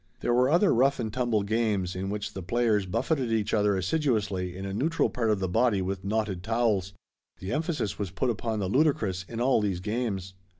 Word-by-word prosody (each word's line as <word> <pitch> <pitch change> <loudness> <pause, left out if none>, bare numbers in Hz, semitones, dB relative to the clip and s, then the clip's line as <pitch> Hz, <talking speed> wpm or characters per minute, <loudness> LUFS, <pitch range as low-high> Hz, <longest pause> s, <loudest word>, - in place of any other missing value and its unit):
There 120 - +1
were 125 +2 +4
other 175 +6 +4
rough 135 +4 +3
and 110 -3 -3
tumble 120 -5 +1
games 100 -4 0
in 95 +1 -3
which 105 0 -4
the 95 - -5
players 105 +1 +1
buffeted 125 - 0
each 110 -2 0
other 105 -2 +3
assiduously 95 - -1
in 95 - -5
a 95 - -4
neutral 160 +10 +1
part 115 -3 0
of 105 - +3
the 95 - -1
body 110 +2 +2
with 95 0 -3
knotted 105 -2 -1
towels. 105 -3 0 0.4
The 95 - -6
emphasis 155 - -2
was 100 -3 -2
put 125 +8 0
upon 115 0 -3
the 100 -3 -1
ludicrous 105 - +1
in 115 - -5
all 125 -2 +3
these 100 -4 -1
games. 100 -2 -3
105 Hz, 205 wpm, -27 LUFS, 95-120 Hz, 0.4 s, were